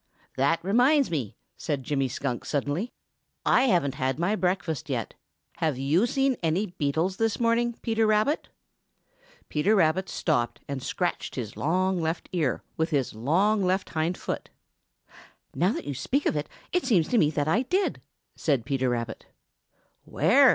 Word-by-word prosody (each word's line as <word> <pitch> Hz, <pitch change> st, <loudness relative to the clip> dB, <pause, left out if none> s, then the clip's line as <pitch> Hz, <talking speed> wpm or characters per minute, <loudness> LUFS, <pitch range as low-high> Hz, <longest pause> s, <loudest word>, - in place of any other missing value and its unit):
"That 140 Hz, +5 st, +3 dB
reminds 250 Hz, -, +3 dB
me," 135 Hz, -11 st, -2 dB, 0.2 s
said 145 Hz, -4 st, -2 dB
Jimmy 135 Hz, -1 st, 0 dB
Skunk 125 Hz, 0 st, -3 dB
suddenly, 150 Hz, -, -2 dB, 0.5 s
"I 260 Hz, -, +4 dB
haven't 170 Hz, -, +2 dB
had 130 Hz, -1 st, -1 dB
my 175 Hz, +6 st, +1 dB
breakfast 180 Hz, -6 st, -1 dB
yet. -, -, -2 dB, 0.4 s
Have 155 Hz, -5 st, 0 dB
you 155 Hz, -, +2 dB
seen 270 Hz, 0 st, +1 dB
any 170 Hz, +5 st, +1 dB
beetles 170 Hz, +1 st, -1 dB
this 225 Hz, -1 st, 0 dB
morning, 235 Hz, 0 st, +2 dB
Peter 225 Hz, -2 st, +2 dB
Rabbit?" 215 Hz, +8 st, +1 dB, 1.0 s
Peter 185 Hz, +9 st, +2 dB
Rabbit 185 Hz, +1 st, +2 dB
stopped 120 Hz, -7 st, 0 dB
and 140 Hz, -2 st, -4 dB
scratched 175 Hz, +7 st, -2 dB
his 115 Hz, -5 st, -5 dB
long 185 Hz, +3 st, +1 dB
left 160 Hz, +1 st, -2 dB
ear 155 Hz, -9 st, 0 dB
with 160 Hz, +1 st, +1 dB
his 140 Hz, -5 st, 0 dB
long 185 Hz, -, +2 dB
left 185 Hz, +1 st, 0 dB
hind 165 Hz, +2 st, -1 dB
foot. -, -, -4 dB, 1.0 s
"Now 180 Hz, -, +1 dB
you 145 Hz, -, -4 dB
speak 260 Hz, -, -1 dB
of -, -, +1 dB
it, 150 Hz, 0 st, -2 dB, 0.2 s
it 360 Hz, -, +2 dB
seems 190 Hz, -11 st, +3 dB
to 240 Hz, -, +3 dB
me 150 Hz, -, +4 dB
that 145 Hz, -1 st, -1 dB
I 195 Hz, +10 st, +3 dB
did," 370 Hz, +9 st, 0 dB, 0.3 s
said 135 Hz, -7 st, 0 dB
Peter 130 Hz, -2 st, 0 dB
Rabbit. 115 Hz, -2 st, -3 dB, 0.8 s
"Where?" -, -, +5 dB
165 Hz, 155 wpm, -27 LUFS, 140-215 Hz, 1.0 s, Where